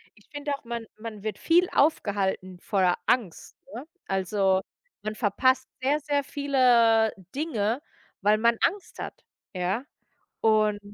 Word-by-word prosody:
Ich 210 - -23
finde 290 0 -3
auch, 280 - -15
man 235 -1 -5
man 215 -1 -8
wird 215 -1 -3
viel 350 +2 +3
aufgehalten 195 - 0
voller 185 -2 +2
Angst, 215 -10 -1 0.2
ne? 245 +6 -7 0.2
Also, 190 0 +1 0.4
man 215 0 -3
verpasst 260 +5 +2
sehr, 285 +4 +2
sehr 290 -1 0
viele 245 -6 +3 0.2
Dinge, 245 -5 -1 0.4
weil 210 +2 +4
man 235 +1 +3
Angst 400 -1 -1
hat, - - -7 0.3
ja? 185 +6 -1 0.6
Und 215 -1 +3
225 Hz, 130 wpm, -26 LUFS, 205-270 Hz, 0.6 s, weil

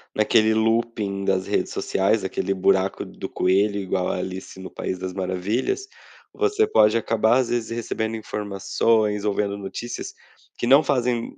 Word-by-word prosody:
naquele 110 0 +3
looping 110 -3 0
das 95 -1 +1
redes - - 0
sociais, - - +1
aquele 95 - -1
buraco 95 0 +1
do - - -8
coelho 100 +3 +2
igual 95 -1 -1
à - - -1
Alice 95 +1 -6
no 95 - -8
País 95 - -4
das 95 0 -5
Maravilhas, 95 - -2 0.5
você 430 0 +2
pode 110 - +4
acabar, 115 +1 +2
às 130 -2 +1
vezes, 120 -2 -1
recebendo 115 -1 -3
informações 105 +1 0
ou 105 - +1
vendo 100 0 -1
notícias 100 +4 -6 0.4
que - - -2
não 140 +4 +7
fazem 125 -4 -1
105 Hz, 155 wpm, -23 LUFS, 95-115 Hz, 0.5 s, não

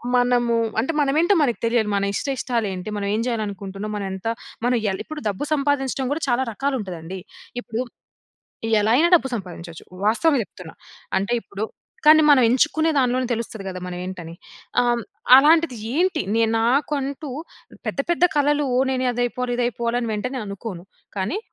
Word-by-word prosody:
మనము 245 -1 +3 0.2
అంటే 255 +8 0
మనమేంటో 315 +7 +3
మనకు 250 -6 +1
తెలియాలి. 230 -2 +1
మన 200 0 +1
ఇష్ట 205 - -3
ఇష్టాలు 240 -3 -1
ఏంటి, 180 +2 -6
మనం 200 - -2
ఏం 220 - 0
చేయాలనుకుంటున్నాం, 205 -3 -4
మనం 205 -1 -3
ఎంత 190 +3 -6 0.4
మనం 250 0 +3
ఇయ్యలి. 195 -3 -1
ఇప్పుడు 310 -1 -7
డబ్బు 200 +6 -3
సంపాదించడం 275 -2 0
కూడా 310 - -4
చాలా 245 +2 +2
రకాలు 275 +5 -1
ఉంటాదండి. 180 -3 -6 0.4
ఇప్పుడు 230 0 -4 1.0
ఎలా 215 +2 +2
అయినా, 335 +4 +4
డబ్బు 270 - -2
సంపాదించొచ్చు 170 -4 -9 0.2
వాస్తవంగ 275 +6 +3
చెప్తున్నా. 180 -4 -12 0.4
అంటే 200 +5 -2
ఇప్పుడు 200 +2 -5 0.4
కానీ 310 +1 +8
మనం 275 -3 +7
ఎంచుకునే 310 +6 +2
దాంట్లోనే 255 0 +2
తెలుస్తది 220 -3 -6
కదా 185 -1 -5
మనం 180 -1 -5
ఏంటని. 170 -3 -7 0.5
ఆహ్, 240 -1 +1 0.3
అలాంటిది 310 -1 +5 0.2
ఏంటి 370 - +2
నేను 225 -1 +2
నాకంటూ 275 +3 0 0.6
పెద్ద, - - -3
పెద్ద 345 +1 +3
కళలు 290 0 +2 0.2
నేను 260 -1 0
అది 245 +1 -1
అయిపోవాలి 245 0 -2
ఇది 245 - +2
అయిపోవాలి 235 0 -1
అని 230 -2 -2
వెంటనే 250 +5 -3
అనుకోను. 200 -3 -7 0.3
కానీ 195 - -1
240 Hz, 160 wpm, -22 LUFS, 205-275 Hz, 1.0 s, కానీ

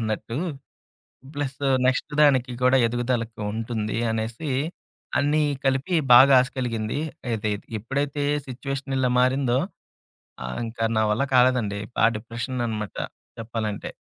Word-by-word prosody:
అన్నట్టు. 110 +2 -3 1.0
Plus 140 -1 -2 0.2
next 135 +3 0
దానికి 130 -4 +4
కూడా 130 +1 +5
ఎదుగుదలకి 120 -1 -2
ఉంటుంది 110 -1 -3
అనేసి 115 +7 -3 0.7
అన్నీ 150 +2 +2 0.2
కలిపి 135 +6 +1 0.2
బాగా 135 +2 +8
ఆశ 125 - 0
కలిగింది. 115 -1 -2 0.3
ఏది 110 -1 -1 0.3
ఎప్పుడైతే 140 +5 -2 0.2
సిట్యుయేషన్ 135 +1 -4
ఇలా 125 -1 +2
మారిందో 130 0 +2 0.9
ఆహ్, 65 0 -4
ఇంకా 115 0 -3
నా 110 - +3
వల్ల 115 - 0
కాలేదండి. 125 -5 +3 0.2
బా - - +3
డిప్రెషననమాట 115 -1 -4 0.4
చెప్పాలంటే. 110 -2 -4
125 Hz, 110 wpm, -24 LUFS, 115-135 Hz, 1.0 s, బాగా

